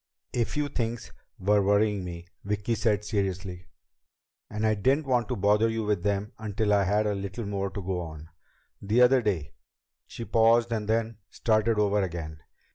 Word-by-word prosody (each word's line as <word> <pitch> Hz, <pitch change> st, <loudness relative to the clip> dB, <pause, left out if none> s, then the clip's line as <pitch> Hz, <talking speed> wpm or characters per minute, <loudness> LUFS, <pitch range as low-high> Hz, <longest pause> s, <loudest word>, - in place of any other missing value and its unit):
"A 120 Hz, -2 st, +1 dB
few 150 Hz, +4 st, -2 dB
things 120 Hz, -4 st, -3 dB, 0.3 s
were 100 Hz, +2 st, +3 dB
worrying 100 Hz, 0 st, +2 dB
me," 85 Hz, -1 st, -7 dB, 0.2 s
Vicki 105 Hz, +3 st, -1 dB
said 105 Hz, -2 st, 0 dB
seriously, 95 Hz, -4 st, -3 dB, 0.8 s
"and 105 Hz, +1 st, -2 dB
I 110 Hz, -, +3 dB
didn't 130 Hz, +9 st, +1 dB
want 125 Hz, -4 st, +1 dB
to -, -, -2 dB
bother 105 Hz, +3 st, +3 dB
you 115 Hz, 0 st, -2 dB
with 105 Hz, -3 st, 0 dB
them 100 Hz, +2 st, -1 dB
until 105 Hz, -1 st, 0 dB
I 100 Hz, -1 st, +3 dB
had 105 Hz, +3 st, +2 dB
a 105 Hz, -, +1 dB
little 100 Hz, +3 st, -5 dB
more 100 Hz, -1 st, -2 dB
to 95 Hz, +2 st, -6 dB
go 90 Hz, 0 st, -2 dB
on. 80 Hz, -2 st, -8 dB, 0.5 s
The 110 Hz, +5 st, +3 dB
other 125 Hz, +1 st, +5 dB
day 95 Hz, -10 st, -2 dB, 0.3 s
" -, -, -58 dB
She 115 Hz, -, -7 dB
paused 115 Hz, +1 st, +3 dB
and 105 Hz, -2 st, -2 dB
then 115 Hz, -1 st, 0 dB
started 110 Hz, 0 st, +1 dB
over 105 Hz, 0 st, +2 dB
again. 80 Hz, -4 st, -5 dB
105 Hz, 180 wpm, -27 LUFS, 100-115 Hz, 0.8 s, other